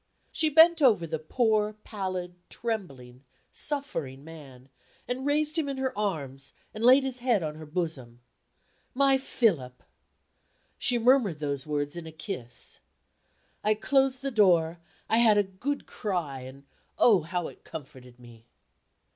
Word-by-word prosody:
She 315 Hz, -, +2 dB
bent 320 Hz, +2 st, +6 dB
over 220 Hz, -11 st, +4 dB
the 160 Hz, -1 st, -3 dB
poor, 215 Hz, +4 st, +1 dB
pallid, 185 Hz, -4 st, -4 dB, 0.2 s
trembling, 140 Hz, -, -5 dB, 0.3 s
suffering 165 Hz, -, -3 dB
man, 140 Hz, -5 st, -12 dB, 0.4 s
and 260 Hz, +3 st, -3 dB
raised 305 Hz, +2 st, +1 dB
him 290 Hz, -3 st, -1 dB
in 275 Hz, -, -4 dB
her 265 Hz, -1 st, -2 dB
arms, 145 Hz, -10 st, -3 dB, 0.2 s
and 215 Hz, -, -6 dB
laid 260 Hz, +3 st, +7 dB
his 260 Hz, -2 st, -4 dB
head 240 Hz, -7 st, +1 dB
on 155 Hz, -1 st, -3 dB
her 155 Hz, 0 st, -10 dB
bosom. 150 Hz, -8 st, -4 dB, 0.8 s
"My 270 Hz, 0 st, +4 dB
Philip!" 165 Hz, -, 0 dB, 1.0 s
She 245 Hz, -, +1 dB
murmured 235 Hz, -, +3 dB
those 140 Hz, -2 st, -3 dB
words 145 Hz, 0 st, -2 dB
in 170 Hz, -2 st, -7 dB
a -, -, -8 dB
kiss. 155 Hz, -, -5 dB, 0.8 s
I 215 Hz, +1 st, +3 dB
closed 270 Hz, +3 st, +1 dB
the 275 Hz, -, -1 dB
door, 175 Hz, -7 st, +3 dB, 0.3 s
I 225 Hz, -, +3 dB
had 220 Hz, -3 st, +5 dB
a 205 Hz, -, +4 dB
good 200 Hz, +10 st, -4 dB
cry; 175 Hz, -, -3 dB
and, 130 Hz, +2 st, -11 dB, 0.3 s
oh, 210 Hz, -7 st, +5 dB
how 170 Hz, +2 st, -3 dB
it -, -, -13 dB
comforted 130 Hz, -5 st, -11 dB
me! 120 Hz, -1 st, -16 dB
185 Hz, 145 wpm, -28 LUFS, -, 1.0 s, laid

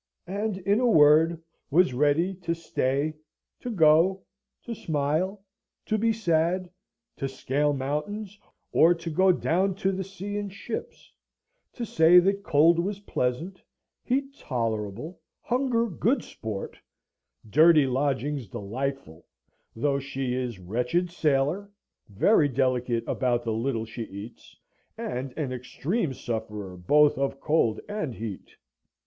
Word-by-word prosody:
and, 200 Hz, +2 st, -2 dB
in 200 Hz, +3 st, +1 dB
a 250 Hz, -, +2 dB
word, 160 Hz, -1 st, +5 dB, 0.3 s
was 170 Hz, -2 st, +4 dB
ready 150 Hz, +8 st, +2 dB
to 170 Hz, -2 st, -3 dB
stay, 145 Hz, -2 st, -1 dB, 0.5 s
to 250 Hz, -, -5 dB
go, 180 Hz, 0 st, +4 dB, 0.4 s
to 235 Hz, -, -5 dB
smile, 165 Hz, +3 st, -1 dB, 0.4 s
to 215 Hz, -, 0 dB
be 225 Hz, +2 st, +2 dB
sad; 180 Hz, -3 st, +1 dB, 0.5 s
to 135 Hz, -, -3 dB
scale 140 Hz, +2 st, 0 dB
mountains, 165 Hz, +10 st, -4 dB, 0.3 s
or 170 Hz, +2 st, +5 dB
to 165 Hz, 0 st, -6 dB
go 185 Hz, +4 st, +4 dB
down 185 Hz, +2 st, +1 dB
to 195 Hz, 0 st, 0 dB
the 190 Hz, 0 st, -3 dB
sea 195 Hz, +2 st, -6 dB
in 205 Hz, -1 st, -3 dB
ships; 230 Hz, -, -7 dB, 0.6 s
to 240 Hz, -, -5 dB
say 165 Hz, -3 st, +5 dB
that 195 Hz, +3 st, +4 dB
cold 165 Hz, -1 st, +4 dB
was 200 Hz, +3 st, -2 dB
pleasant, 165 Hz, +3 st, -2 dB, 0.4 s
heat 275 Hz, +2 st, -1 dB
tolerable, 115 Hz, -, -3 dB, 0.2 s
hunger 245 Hz, -2 st, 0 dB
good 230 Hz, -, 0 dB
sport, 110 Hz, -3 st, -7 dB, 0.7 s
dirty 155 Hz, +5 st, +6 dB
lodgings 135 Hz, 0 st, -1 dB
delightful; 105 Hz, -, -5 dB, 0.5 s
though 140 Hz, +4 st, 0 dB
she 135 Hz, -2 st, -3 dB
is 125 Hz, -4 st, -3 dB
wretched 125 Hz, -, -1 dB
sailor, 155 Hz, +5 st, 0 dB, 0.4 s
very 145 Hz, -, +3 dB
delicate 125 Hz, -2 st, 0 dB
about 120 Hz, -2 st, 0 dB
the 115 Hz, -, -1 dB
little 115 Hz, 0 st, -1 dB
she 115 Hz, +1 st, -6 dB
eats, 100 Hz, +4 st, -11 dB, 0.4 s
and 125 Hz, +2 st, -4 dB
an 145 Hz, -5 st, -2 dB
extreme 140 Hz, -, -2 dB
sufferer 105 Hz, -6 st, -5 dB
both 150 Hz, +11 st, +3 dB
of 135 Hz, 0 st, -1 dB
cold 135 Hz, -8 st, +1 dB
and 205 Hz, -, -4 dB
heat. 110 Hz, -4 st, -7 dB
150 Hz, 130 wpm, -26 LUFS, 125-190 Hz, 0.7 s, dirty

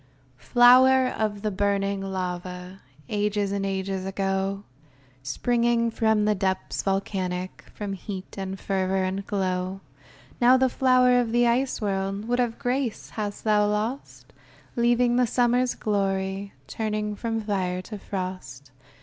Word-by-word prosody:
] -, -, -24 dB
LOWER 255 Hz, +1 st, +7 dB
of 210 Hz, -3 st, -2 dB
the 215 Hz, -, 0 dB
burning 200 Hz, 0 st, 0 dB
lava 180 Hz, 0 st, -5 dB, 0.3 s
Ages 205 Hz, -2 st, 0 dB
and 200 Hz, -1 st, -1 dB
ages 195 Hz, -1 st, -2 dB
ago 195 Hz, +1 st, -2 dB, 0.6 s
Springing 235 Hz, -, +1 dB
from 220 Hz, -2 st, +2 dB
depths 190 Hz, -2 st, -1 dB
volcanic 185 Hz, -2 st, -3 dB
From 205 Hz, -2 st, -4 dB
heat 190 Hz, 0 st, -7 dB
and 195 Hz, -1 st, -5 dB
fervor 190 Hz, -1 st, 0 dB
and 190 Hz, +1 st, -2 dB
glow, 185 Hz, -1 st, -2 dB, 0.6 s
Now 250 Hz, +2 st, +7 dB
the 260 Hz, 0 st, +3 dB
flower 250 Hz, -1 st, +4 dB
of 235 Hz, -2 st, -1 dB
the 240 Hz, +1 st, +3 dB
ice 250 Hz, +3 st, +1 dB
world, 195 Hz, +1 st, -2 dB
What 245 Hz, +1 st, 0 dB
of 240 Hz, -2 st, 0 dB
grace 250 Hz, -2 st, -2 dB
hast 205 Hz, -2 st, -4 dB
thou 210 Hz, -1 st, +3 dB
lost? 215 Hz, +6 st, -4 dB, 0.4 s
Leaving 240 Hz, 0 st, +3 dB
the 250 Hz, -1 st, +3 dB
summer's 245 Hz, +1 st, +2 dB
glory, 195 Hz, -1 st, -1 dB
Turning 210 Hz, +6 st, -3 dB
from 225 Hz, +1 st, -2 dB
fire 185 Hz, -4 st, -2 dB
to 210 Hz, +1 st, -8 dB
frost. 180 Hz, -10 st, -6 dB
205 Hz, 130 wpm, -25 LUFS, 190-235 Hz, 0.6 s, LOWER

